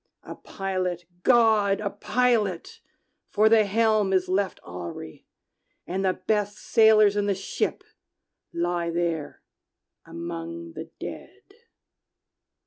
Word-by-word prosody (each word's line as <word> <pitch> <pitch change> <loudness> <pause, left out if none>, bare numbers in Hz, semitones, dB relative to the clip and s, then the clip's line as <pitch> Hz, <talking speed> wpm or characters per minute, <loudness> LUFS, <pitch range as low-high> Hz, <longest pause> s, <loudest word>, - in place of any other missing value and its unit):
A - - -8
pilot, 185 -3 -4 0.2
GOD, 220 -4 +4
a 205 -1 -3
pilot! 210 -4 0 0.5
for 215 +1 +3
the 220 -1 +5
helm 215 -1 +2
is 185 -1 +2
left 190 +1 -1
awry, 85 -2 -8 0.6
And 190 +2 -3
the 190 -1 +2
best 205 0 -1
sailors 215 -2 +5
in 205 0 0
the 200 - +1
ship 190 - -3 0.7
lie 170 0 -1
there 170 -3 -3 0.6
among 85 0 -7
the - - -8
dead!" - - -9
195 Hz, 110 wpm, -25 LUFS, 170-215 Hz, 0.7 s, the